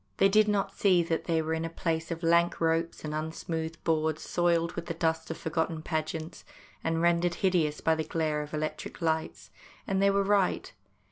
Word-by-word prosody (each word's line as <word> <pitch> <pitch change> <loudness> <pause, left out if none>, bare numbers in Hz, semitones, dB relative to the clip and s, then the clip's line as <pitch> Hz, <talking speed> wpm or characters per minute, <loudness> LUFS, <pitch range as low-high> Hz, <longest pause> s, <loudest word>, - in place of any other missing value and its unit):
They 195 - +5
did 215 +1 +5
not 205 -2 0
see 185 -4 +4
that 165 -1 -2
they 160 -1 +1
were 160 +1 -2
in 160 0 -1
a 165 - -2
place 165 -1 -2
of 165 0 -5
lank 170 +1 +3
ropes 165 0 0
and 150 - -3
unsmoothed 160 +1 -4
boards 155 -1 0
soiled 170 -1 +1
with 170 -1 -6
the 165 - -3
dust 160 0 -1
of - - -4
forgotten 160 0 -2
pageants 160 +1 -3 0.4
and 165 0 0
rendered 175 0 +2
hideous 170 -6 +1
by 160 - +3
the 160 0 -1
glare 155 -2 -1
of 150 0 -7
electric 155 0 -4
lights; 160 -2 -2 0.3
and 195 0 0
they 200 - +5
were 200 0 +2
right. 200 -1 +1
165 Hz, 195 wpm, -29 LUFS, 160-175 Hz, 0.4 s, They